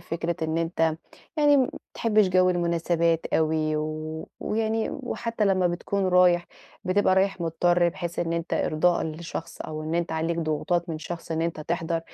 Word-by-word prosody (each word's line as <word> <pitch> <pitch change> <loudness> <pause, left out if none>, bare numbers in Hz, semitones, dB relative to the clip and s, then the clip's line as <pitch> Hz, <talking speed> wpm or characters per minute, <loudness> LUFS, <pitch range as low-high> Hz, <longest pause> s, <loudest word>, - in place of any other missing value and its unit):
فكرة 170 0 -3
إن 160 +1 0
أنت 165 -1 0 0.4
يعني 290 -1 +5
ما 260 -2 +3 0.2
بتحبش 215 -4 +3
جو 185 0 +4
المناسبات 170 -1 +1
أوي، 155 -1 +1
و 155 +1 -4
ويعني 220 +1 -1
وحتى 230 -4 -3
لمّا 190 -2 +3
بتكون 185 +3 -1
رايح 180 -1 +4 0.4
بتبقى 185 +1 +3
رايح 195 0 +1
مضطر، 175 +1 +2
بحيث 170 0 -5
إن 165 -1 0
أنت 170 0 -2
إرضاءً 170 +3 +2
لشخص، 165 +1 -6
أو 155 0 -5
إن 155 +1 -3
أنت 170 -1 -1
عليك 165 +1 -1
ضغوطات 170 +2 -1
من 160 - -3
شخص 165 +1 -7
إن 160 0 0
أنت 165 -2 -2
تحضر، 165 +1 -1
170 Hz, 165 wpm, -26 LUFS, 160-185 Hz, 0.4 s, يعني